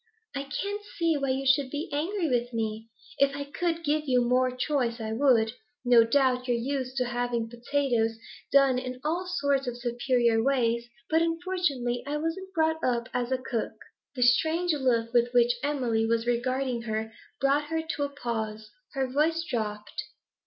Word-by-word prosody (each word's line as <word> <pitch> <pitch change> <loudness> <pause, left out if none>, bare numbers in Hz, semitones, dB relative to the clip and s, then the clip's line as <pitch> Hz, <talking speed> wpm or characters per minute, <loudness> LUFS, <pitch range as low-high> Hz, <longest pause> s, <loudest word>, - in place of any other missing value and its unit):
'I 275 0 -3 0.2
can't 405 +1 -3 0.2
see 335 -2 +2
why 275 -2 -1
you 265 +1 -1
should 270 0 +3
be 295 +4 -4
angry 335 +5 -1
with 245 -2 0
me. 220 0 -3 0.3
If 280 0 +3
I 285 - -3
could 330 +3 -2
give 300 0 0
you 250 -2 +3
more 255 +1 +3
choice 250 -2 -1
I 220 0 -3
would. 230 -3 +3 0.3
No 240 -2 +7
doubt 255 +1 +2
you're 240 -1 +2
used 260 +1 -3
to 250 - +2
having 240 -1 -1
potatoes 240 -2 0 0.3
done 275 -2 +5
in 255 0 -6
all 340 +5 -1
sorts 280 -6 0
of 240 -1 -3
superior 240 -1 +1
ways, 235 -2 +1 0.2
but 320 +1 +3
unfortunately 330 -8 -1
I 295 +1 -1
wasn't 330 +5 -3
brought 320 0 +1
up 235 -2 0
as 245 0 -1
a 260 - +2
cook 250 -3 -3 0.2
' - - -57
The 250 - +1
strange 320 +8 +3
look 240 -5 +1
with 240 0 +3
which 240 0 +5
Emily 245 -6 0
was 230 0 +1
regarding 250 +1 0
her 220 +1 -2 0.3
brought 280 +3 +2
her 320 +1 -2
to 320 -2 -4
a 285 - -1
pause; 220 -5 -4 0.2
her 270 -2 0
voice 310 +5 +1
dropped. 215 -2 -3
255 Hz, 175 wpm, -28 LUFS, 235-290 Hz, 0.3 s, No